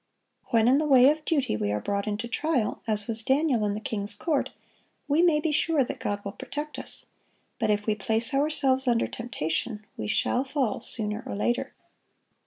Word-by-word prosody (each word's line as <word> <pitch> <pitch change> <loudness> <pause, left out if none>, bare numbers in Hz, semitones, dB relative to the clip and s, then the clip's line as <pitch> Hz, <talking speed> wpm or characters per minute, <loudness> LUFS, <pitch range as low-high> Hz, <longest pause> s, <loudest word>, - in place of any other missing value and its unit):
When 230 -1 +3
in 265 +3 +5
the 305 - 0
way 265 -1 +7
of 310 0 -4
duty 280 - +1
we 105 -1 -1
are 105 - 0
brought 200 - -2
into 210 +3 -2
trial, 265 -3 -1
as 210 -2 0
was 225 +1 -2
Daniel 265 -1 +2
in 205 - -1
the - - -3
king's 205 -2 -3
court, 290 +6 0 0.6
we 295 +3 +3
may 335 -4 +4
be 320 0 0
sure 300 -1 +2
that - - -6
God 205 0 -3
will 200 - -3
protect 295 +8 -6
us; - - -7 0.5
but 220 -3 +1
if 210 0 +1
we 215 - +2
place 220 +5 -1
ourselves 275 -2 +2
under 235 -1 +3
temptation, 215 -1 -3
we 105 - -3
shall 250 - +1
fall 265 -5 -1
sooner 210 -2 -4
or - - -4
later. 240 +4 -1
235 Hz, 195 wpm, -27 LUFS, 210-285 Hz, 0.6 s, way